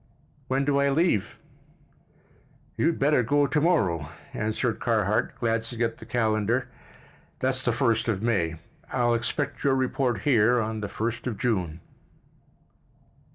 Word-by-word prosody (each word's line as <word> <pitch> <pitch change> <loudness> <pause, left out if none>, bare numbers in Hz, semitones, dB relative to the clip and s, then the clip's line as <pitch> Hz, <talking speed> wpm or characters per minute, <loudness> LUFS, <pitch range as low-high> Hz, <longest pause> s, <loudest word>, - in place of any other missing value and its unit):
"When 135 +1 0
do 140 0 +2
I 140 0 +3
leave?" 140 - +1 1.4
"You'd 165 +1 +1
better 140 -1 +3
go 145 +5 +2
to 150 +1 0
morrow," 95 - +1 0.2
answered 110 +2 -1
Carhart, 110 -3 +1
glancing 115 0 -1
at 115 0 -2
the 115 - -11
calendar. 115 +1 0 0.7
"That's 130 0 0
the - - +2
1st 115 -1 +1
of 105 -3 -1
May. 85 -9 +1 0.4
I'll 120 -2 +2
expect 140 +5 -2
your 140 -2 +3
report 130 -4 0
here 120 -2 +4
on 110 -1 -2
the 105 - -3
1st 115 +4 -3
of 115 -5 -3
June." 90 -8 -1
120 Hz, 135 wpm, -26 LUFS, 110-135 Hz, 1.4 s, here